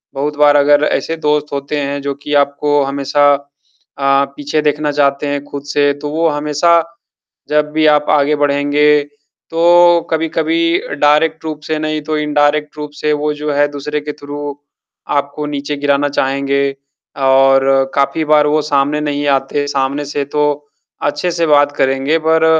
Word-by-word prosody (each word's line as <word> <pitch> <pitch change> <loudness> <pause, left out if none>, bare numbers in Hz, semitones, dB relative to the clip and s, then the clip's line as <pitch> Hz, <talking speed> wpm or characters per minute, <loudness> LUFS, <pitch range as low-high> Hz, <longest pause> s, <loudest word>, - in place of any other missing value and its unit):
बहुत 145 +2 -3
बार 145 0 +5
अगर 145 +1 +4
ऐसे 165 - -1
दोस्त 150 -1 -1
होते 140 +2 -3
हैं 140 0 -3
जो 140 0 -3
कि 150 - -4
आपको 145 +1 -1
हमेशा 140 +1 +1
अ, 140 0 -3
पीछे 145 +1 -2
देखना 150 0 0
चाहते 140 0 0
हैं 145 0 -3
खुद 140 -1 -8
से, 145 0 +1
तो 145 +1 -7
वो 165 +2 0
हमेशा 150 +3 +1 0.8
जब 150 0 +1
भी 155 0 +2
आप 150 -1 +3
आगे 150 +1 +2
बढ़ेंगे, 145 +1 +2 0.5
तो 175 +1 +5
कभी 160 0 0
कभी 335 - 0 0.2
डायरेक्ट 155 +2 +2
रूप 155 -1 -5
से 155 - -2
नहीं, 155 0 -2
तो 155 0 -3
इनडायरेक्ट 150 0 0
रूप 150 0 -6
से 150 +1 -1
वो 150 0 -1
जो 150 0 -4
है, 145 +1 +2
दूसरे 145 +1 -4
के 150 0 -6
थ्रू 145 0 -7 0.6
आपको 140 +1 -3
नीचे 145 0 -4
गिराना 145 0 +1
चाहेंगे 140 0 -1 0.6
और 135 0 +3
काफ़ी 140 +3 0
बार 150 0 +4
वो 150 +1 +1
सामने 145 +1 +1
नहीं 145 -1 -2
आते। 145 +2 -3
सामने 140 +1 -1
से 145 0 -3
तो 150 +1 -1 0.6
अच्छे 145 +5 -1
से 170 -1 0
बात 145 -1 +3
करेंगे 135 +4 +1
पर 160 0 +3
145 Hz, 165 wpm, -15 LUFS, 140-150 Hz, 0.8 s, बार